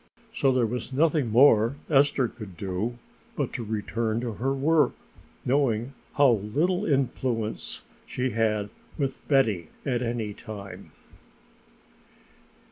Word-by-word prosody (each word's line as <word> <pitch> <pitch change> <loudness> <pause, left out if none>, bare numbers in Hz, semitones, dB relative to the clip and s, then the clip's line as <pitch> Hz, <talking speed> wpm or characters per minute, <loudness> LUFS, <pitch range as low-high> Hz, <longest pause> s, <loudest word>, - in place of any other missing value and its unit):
So 140 - +2
there 125 -2 +2
was 120 +2 -4
nothing 145 -2 +2
more 115 0 +5
for - - -7
Esther 135 -2 +4
to 110 -2 -9
do 95 +5 -4 0.4
but - - -2
to 120 - -3
return 110 +1 -2
to 120 -1 -3
her 125 +6 -1
work, 145 +1 +3 0.5
knowing 125 -2 +1 0.2
how 140 -3 +6
little 150 - 0
influence 125 -5 -1 0.2
she 125 0 -2
had 105 -2 0 0.3
with 135 -3 -2
Betty 110 - +2 0.2
at 125 -3 0
any 115 -3 -2
time. 100 -3 -9
120 Hz, 125 wpm, -26 LUFS, 110-135 Hz, 0.5 s, how